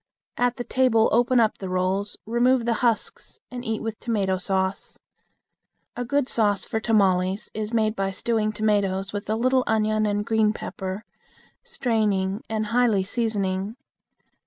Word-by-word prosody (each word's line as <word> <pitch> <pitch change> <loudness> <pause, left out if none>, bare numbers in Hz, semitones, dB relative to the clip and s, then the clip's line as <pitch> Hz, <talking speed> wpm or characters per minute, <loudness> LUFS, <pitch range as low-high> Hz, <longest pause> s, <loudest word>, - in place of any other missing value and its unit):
At 245 0 +1
the 245 - -4
table 245 -3 +3
open 245 +2 +3
up 225 -2 +2
the 190 - -5
rolls, 185 +2 -1
remove 240 +2 +2
the 235 - +2
husks, 235 -3 -1
and 245 -1 -6
eat 220 -2 -3
with 225 -1 -4
tomato 195 -5 0
sauce. 190 +1 -2 1.0
A 245 - -3
good 280 +2 0
sauce 205 -5 +1
for 220 - -2
tamales 195 -3 +1
is 215 0 -4
made 220 -2 +1
by 195 -2 -1
stewing 215 +2 0
tomatoes 205 -2 0
with 205 0 -5
a 215 - +1
little 255 +3 +2
onion 215 -1 +1
and 205 0 -1
green 220 -2 +2
pepper, 190 0 -6 0.6
straining 215 - 0
and 220 -1 -1
highly 235 -6 +3
seasoning. 200 -2 -1
215 Hz, 150 wpm, -24 LUFS, 195-235 Hz, 1.0 s, table